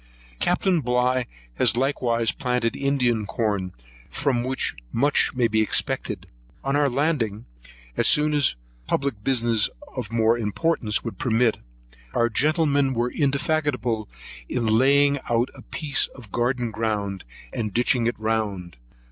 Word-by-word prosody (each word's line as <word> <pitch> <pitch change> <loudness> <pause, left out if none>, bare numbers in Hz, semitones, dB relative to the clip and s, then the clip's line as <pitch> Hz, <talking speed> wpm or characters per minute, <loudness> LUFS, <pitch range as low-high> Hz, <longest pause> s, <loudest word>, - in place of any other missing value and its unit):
Captain 180 -1 +2
Bligh 125 0 +1 0.3
has - - +3
likewise 120 -4 +1
planted 125 -3 -1
Indian 125 -6 0
corn, 100 -3 -1 0.4
from 135 - 0
which 130 +1 0 0.2
much 140 +3 +2
may 125 -2 +3
be 110 -1 +1
expected. 110 - 0 0.4
On 135 +1 0
our 145 -1 +3
landing, 125 -6 -1 0.5
as - - +1
soon 150 0 +3
as 145 - +3 0.3
public 135 -7 -1
business 115 -4 +2 0.3
of 120 -5 -5
more 115 0 +2
importance 110 0 0
would 115 - -6
permit, 115 -1 +2 0.6
our 120 0 +3
gentlemen 145 0 +2
were 120 +1 0
indefatigable 140 -6 0 0.4
in 120 - -1
laying 140 +5 +4
out 120 +1 +2
a - - -13
piece 150 -3 0
of 115 -7 -13
garden 120 -1 0
ground, 105 -3 -2 0.3
and 105 -2 -2
ditching 120 +2 +2
it 120 - -2
round. 105 - -2
120 Hz, 130 wpm, -24 LUFS, 110-140 Hz, 0.6 s, laying